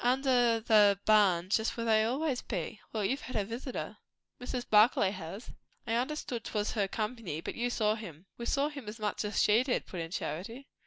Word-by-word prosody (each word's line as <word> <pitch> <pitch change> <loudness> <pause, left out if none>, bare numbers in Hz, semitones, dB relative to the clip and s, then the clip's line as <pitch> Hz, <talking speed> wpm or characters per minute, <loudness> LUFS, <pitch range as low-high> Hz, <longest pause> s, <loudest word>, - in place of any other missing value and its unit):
"Under 245 -2 +3
the 210 -3 +5
barn 190 -4 +4
just 220 +2 +1
where 230 - -2
they 220 -1 +4
always 260 +3 -1
be. 200 +1 -5
Well, 215 -3 -1
you've 270 +8 -1
had 255 - -8
a 210 -2 +1
visitor?" 240 +4 -5 0.4
"Mrs. 250 0 -4
Barclay 210 -2 +5
has." 190 +4 -8 0.3
"I 225 - -2
understood 250 -1 -2
'twas 210 -1 -2
her 205 -3 0
company; 215 -6 -4
but - - -5
you 240 +1 -1
saw 215 -3 +1
him?" 180 -7 -9
"We 235 - -6
saw 280 +2 +1
him 280 -7 -9
as 215 - -8
much 210 -1 -2
as 210 0 -1
she 215 +3 +5
did," 255 -1 -1
put 180 - -7
in 165 - -5
Charity. 190 - -5
220 Hz, 200 wpm, -31 LUFS, 205-245 Hz, 0.4 s, the